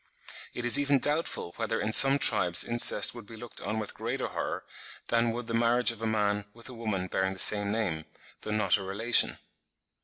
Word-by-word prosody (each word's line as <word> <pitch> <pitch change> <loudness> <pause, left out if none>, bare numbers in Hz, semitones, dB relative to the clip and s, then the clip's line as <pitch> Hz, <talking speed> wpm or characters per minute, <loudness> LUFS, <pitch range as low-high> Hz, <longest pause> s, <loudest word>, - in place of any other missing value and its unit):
It 120 - -5
is 120 +3 +7
even 145 -1 +1
doubtful 145 - -3
whether 115 0 -3
in 105 - -3
some 135 +3 +7
tribes 100 -10 +3
incest 120 -3 +3
would 120 -4 -12
be 115 - -12
looked 120 +1 -7
on 110 - -5
with 110 -2 -6
greater 120 +4 -5
horror, - - -5 0.5
than 115 0 0
would 120 +1 -5
the 115 - -7
marriage 120 +1 +1
of 115 -1 -13
a 115 - -3
man 105 -2 -2
with 115 - -13
a - - -10
woman 110 -6 -4
bearing 95 +1 -3
the - - -13
same 105 0 +4
name, 90 -8 -4 0.4
though - - -9
not 105 0 +1
a 100 - -8
relation. 110 +5 +1
115 Hz, 205 wpm, -27 LUFS, 105-120 Hz, 0.5 s, is